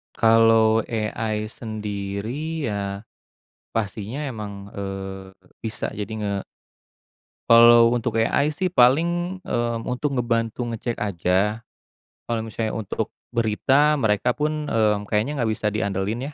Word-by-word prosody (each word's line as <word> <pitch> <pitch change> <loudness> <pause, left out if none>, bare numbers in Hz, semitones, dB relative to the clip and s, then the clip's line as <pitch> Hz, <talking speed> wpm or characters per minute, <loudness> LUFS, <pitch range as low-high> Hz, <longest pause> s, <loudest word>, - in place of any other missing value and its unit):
Kalau 115 0 +5
AI 110 -1 -2
sendiri 110 +8 -4
ya 100 0 -4 0.7
pastinya 110 +3 -3
emang, 105 -6 -6
eee, 95 -1 -6 0.3
bisa 110 -1 -3
jadi 105 -1 -5
nge 105 -1 -2 1.2
Kalau 115 0 +8
untuk 115 -1 -1
AI 140 +6 +2
sih 185 +5 -1
paling, 175 +6 +2
mmm, 120 -10 -2
untuk 135 +3 -1
ngebantu 115 0 -1
ngecek 115 0 -4
aja, 100 +2 0 0.6
kalo 115 -1 -1
misalnya 110 0 -3
untuk 110 -3 -3 0.2
berita 130 +7 +3
mereka 110 +2 +2
pun, 150 +2 -2
eee, 110 -5 +2
kayaknya 110 +9 -1
nggak 115 -3 +1
bisa 105 0 -1
diandelin 105 +6 -2
115 Hz, 115 wpm, -23 LUFS, 105-125 Hz, 1.2 s, Kalau